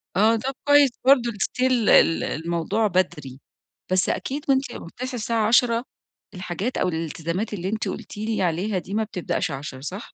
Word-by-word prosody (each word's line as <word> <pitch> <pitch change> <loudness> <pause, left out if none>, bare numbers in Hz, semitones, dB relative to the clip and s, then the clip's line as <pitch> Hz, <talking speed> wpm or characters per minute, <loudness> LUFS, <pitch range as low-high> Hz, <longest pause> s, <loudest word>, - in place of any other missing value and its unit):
آه، 220 +4 +4
طَب 260 +4 -3
كويس 290 -1 +6 0.2
برضه 250 -3 +5
still 255 +5 0 0.2
ال 165 - +5
الموضوع 170 +7 -1
بدري، 165 -8 -2 0.5
بس 185 0 +2
أكيد 285 +3 -3
وأنتِ 270 0 +3
بتصحى 255 +9 -7
الساعة 225 -1 0
10:00 235 0 +3 0.5
الحاجات 185 +5 -4
أو - - +1
الالتزامات 165 +5 -3
اللي 185 -1 -3
أنتِ 220 +1 -2
قُلتِ - - -6
لي 215 -1 -2
عليها 185 +4 0
دي 190 +4 -9
ما 220 +1 +1
بتبدأش 180 -6 -3
10، 135 -1 -6
صح؟ 185 +9 -7
210 Hz, 160 wpm, -24 LUFS, 170-235 Hz, 0.5 s, كويس